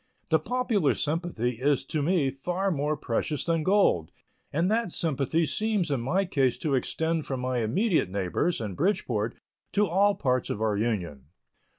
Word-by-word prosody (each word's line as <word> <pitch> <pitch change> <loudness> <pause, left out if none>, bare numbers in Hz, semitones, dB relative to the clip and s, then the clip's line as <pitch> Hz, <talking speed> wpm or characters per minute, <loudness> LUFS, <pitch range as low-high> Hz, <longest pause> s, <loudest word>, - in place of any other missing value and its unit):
The 160 - +5
popular 225 - +1
sympathy 145 -7 -2
is 140 -1 +2
to 150 +2 -2
me 150 -3 +2
far 180 +8 -2
more 150 -1 -1
precious 140 +4 -2
than 165 -1 +1
gold, 185 - +3 0.4
and 170 +6 +1
that 225 -4 +1
sympathy 160 +1 0
seems 210 -2 0
in 135 -4 0
my 180 +11 +1
case 135 -8 +1
to 150 - -2
extend 160 +4 0
from 135 -2 -2
my 125 0 -1
immediate 160 - +1
neighbors, 100 - -1
in 105 -4 -4
Bridgeport, 120 - 0 0.4
to 210 0 +3
all 200 +3 +3
parts 130 -3 0
of - - -2
our 110 -1 +1
Union. 95 - -2
150 Hz, 165 wpm, -27 LUFS, 125-180 Hz, 0.4 s, The